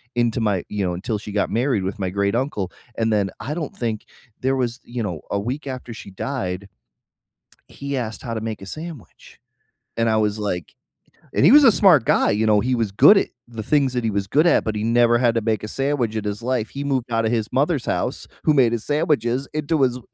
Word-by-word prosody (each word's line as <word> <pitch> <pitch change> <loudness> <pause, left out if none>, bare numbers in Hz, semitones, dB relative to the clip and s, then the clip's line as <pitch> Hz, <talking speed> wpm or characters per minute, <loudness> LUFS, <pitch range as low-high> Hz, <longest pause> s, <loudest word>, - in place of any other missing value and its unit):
into 120 0 +1
my 100 -5 0
you 105 -1 -2
know, 90 - -1
until 105 +4 -3
she 105 0 -8
got 100 0 0
married 120 -3 +1
with 100 +3 -4
my 95 -2 -1
great-uncle, 100 +1 -1 0.3
and 115 -1 +1
then 100 -2 +1
I 145 +5 -4
don't 155 -3 -5
think 115 -3 -3 0.4
there 130 +1 +1
was 125 0 -2
you 120 -1 -5
know, 85 -7 -4
a 100 - 0
week 130 +7 -4
after 130 -3 -6
she 105 - -10
died, 95 -4 -4 1.0
he 140 0 -5
asked 110 -3 -4
how 115 - -4
to 110 - -3
make 110 -2 -5
a 95 - -8
sandwich. 160 - -10 0.6
And 115 0 +2
I 110 - +2
was 105 0 0
like 90 -4 -4 0.6
and - - +2
he 195 - +7
was 295 +1 +8
a 245 - +8
smart 180 - +5
guy, - - +3
you 110 +1 +1
know, 105 -1 +4
he 125 +3 0
was 115 -4 -1
good 145 - +7
at - - +1 0.2
the 115 -2 -7
things 135 +1 +2
that 125 - -1
he 110 - 0
was 100 -1 -2
good 150 - +3
at, 170 - +4
but 110 -1 -2
he 105 - -2
never 120 +1 +4
had 120 -1 +2
to 115 - +1
make 110 -2 -1
a 105 - -4
sandwich 135 -4 -1
in 110 - -2
his 105 +1 -4
life. 125 -3 -1
He 140 - -5
moved 130 -4 -2
out 115 0 +1
of 110 - +1
his 110 -2 -1
mother's 140 +1 +1
house - - -2 0.2
who 155 - +4
made 130 -5 +4
his 115 -2 -3
sandwiches 145 -4 0
into 155 0 0
his 125 -1 +2
115 Hz, 235 wpm, -22 LUFS, 105-135 Hz, 1.0 s, was